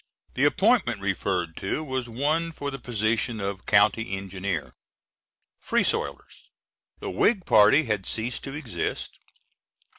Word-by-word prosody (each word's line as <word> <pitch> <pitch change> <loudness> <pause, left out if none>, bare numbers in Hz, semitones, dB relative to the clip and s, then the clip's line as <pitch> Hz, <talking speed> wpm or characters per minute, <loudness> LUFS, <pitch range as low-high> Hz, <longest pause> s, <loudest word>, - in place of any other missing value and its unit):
The - - +2
appointment - - +3
referred 85 -4 -1
to 120 +11 -2
was 130 -4 -3
one 155 +8 0
for 145 -3 -5
the 135 - -6
position 115 -1 -1
of 100 -1 -4
County 105 0 +3
Engineer. 95 -3 -4 0.9
Free - - +1
Soilers: - - -3 0.5
"The - - -5
Whig 190 - +2
party 110 +9 +6
had 105 -7 -2
ceased 115 +2 -2
to 135 0 -6
exist 145 -6 -4
115 Hz, 125 wpm, -26 LUFS, 100-140 Hz, 0.9 s, party